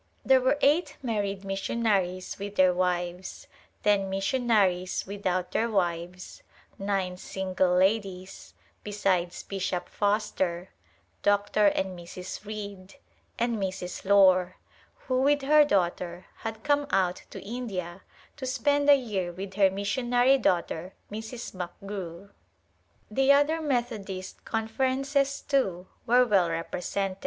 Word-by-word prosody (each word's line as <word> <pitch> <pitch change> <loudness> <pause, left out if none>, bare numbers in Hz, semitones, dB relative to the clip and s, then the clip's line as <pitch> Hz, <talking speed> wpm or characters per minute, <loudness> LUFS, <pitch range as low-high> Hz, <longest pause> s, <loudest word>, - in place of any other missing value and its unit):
There 265 -1 +5
were 260 +3 +2
eight 300 +6 +2
married 200 -4 -2
missionaries 195 -2 -1
with 200 +1 -6
their 185 -2 +5
wives, 180 0 -2 0.4
ten 200 -2 +2
missionaries 195 -3 +1
without 185 -2 -2
their 230 +1 +1
wives, 180 -2 -2 0.4
nine 195 -2 -1
single 185 -1 0
ladies, 190 -1 -1 0.3
besides 190 -4 -1
Bishop 185 -2 -3
Foster, 195 -4 -1 0.5
Dr. 205 +1 +3
and 190 -1 0
Mrs. 180 +3 -8
Reed, 200 -3 -7 0.4
and 235 -1 0
Mrs. 190 -2 -4
Lore, 185 -2 +5 0.5
who 255 -1 +1
with 285 +1 +3
her 300 +2 +6
daughter, 180 -6 -1
had 225 -1 -6
come 290 -1 +2
out 185 -6 +1
to - - -8
India 195 -6 -5 0.4
to 260 - -5
spend 285 +2 +1
a 285 - +10
year 205 -9 -2
with 190 +2 -7
her 195 -1 +4
missionary 245 +7 +2
daughter, 180 -3 0 0.2
Mrs. 220 +3 -6
McGrew. 185 0 -7 0.8
The 270 +5 +4
other 290 +3 +3
Methodist 225 -9 -3
Conferences, 265 +5 0
too, 190 -11 0 0.2
were 250 +2 +5
well 195 -7 +3
represented. 180 +3 -3
200 Hz, 115 wpm, -27 LUFS, 185-235 Hz, 0.8 s, a